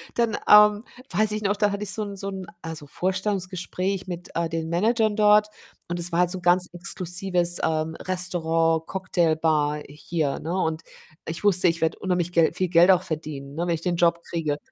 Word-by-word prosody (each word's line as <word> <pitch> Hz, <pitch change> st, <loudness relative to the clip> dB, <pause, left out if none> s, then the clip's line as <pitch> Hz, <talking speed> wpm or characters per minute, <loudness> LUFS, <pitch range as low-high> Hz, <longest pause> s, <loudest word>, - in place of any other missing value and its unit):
dann, 235 Hz, -2 st, +1 dB
ähm, 210 Hz, 0 st, +6 dB, 0.3 s
weiß 215 Hz, 0 st, +1 dB
ich 215 Hz, -, -3 dB
noch, 205 Hz, 0 st, 0 dB
da 205 Hz, 0 st, +1 dB
hatte 200 Hz, +1 st, -4 dB
ich 205 Hz, 0 st, -3 dB
so 215 Hz, -, -3 dB
'n 200 Hz, -1 st, -7 dB
so 195 Hz, -, -6 dB
'n, 190 Hz, -2 st, -5 dB, 0.2 s
also, 160 Hz, -2 st, -7 dB
Vorstellungsgespräch 185 Hz, +2 st, -3 dB
mit, 175 Hz, -1 st, -7 dB
äh, 170 Hz, -1 st, -1 dB
den 165 Hz, -1 st, -3 dB
Managern 215 Hz, +5 st, +1 dB
dort 210 Hz, 0 st, +5 dB, 0.4 s
und 175 Hz, 0 st, -4 dB
es 175 Hz, -, +1 dB
war 170 Hz, -, 0 dB
halt 180 Hz, 0 st, +3 dB
so 190 Hz, -, -2 dB
'n -, -, -15 dB
ganz 180 Hz, +1 st, +3 dB
exklusives, 180 Hz, -1 st, 0 dB
ähm, 160 Hz, 0 st, -1 dB
Restaurant, 165 Hz, -3 st, 0 dB
Cocktailbar 160 Hz, -5 st, 0 dB
hier, 150 Hz, 0 st, -3 dB
ne? 165 Hz, +3 st, -4 dB
Und 160 Hz, -4 st, -1 dB, 0.5 s
ich 165 Hz, +5 st, -5 dB
wusste, 185 Hz, -3 st, +5 dB
ich 165 Hz, 0 st, -2 dB
werde 160 Hz, 0 st, 0 dB
unheimlich 180 Hz, -2 st, -1 dB
Gel 165 Hz, -2 st, +4 dB
viel 185 Hz, -, -1 dB
Geld 175 Hz, +2 st, +5 dB
auch 185 Hz, -1 st, +3 dB
verdienen, 150 Hz, -4 st, -6 dB
ne, 170 Hz, +2 st, -2 dB
wenn 170 Hz, -, +1 dB
ich 160 Hz, -, -8 dB
den 175 Hz, -1 st, -1 dB
Job 170 Hz, 0 st, +2 dB
kriege 155 Hz, -4 st, -2 dB
175 Hz, 200 wpm, -24 LUFS, 165-195 Hz, 0.5 s, ähm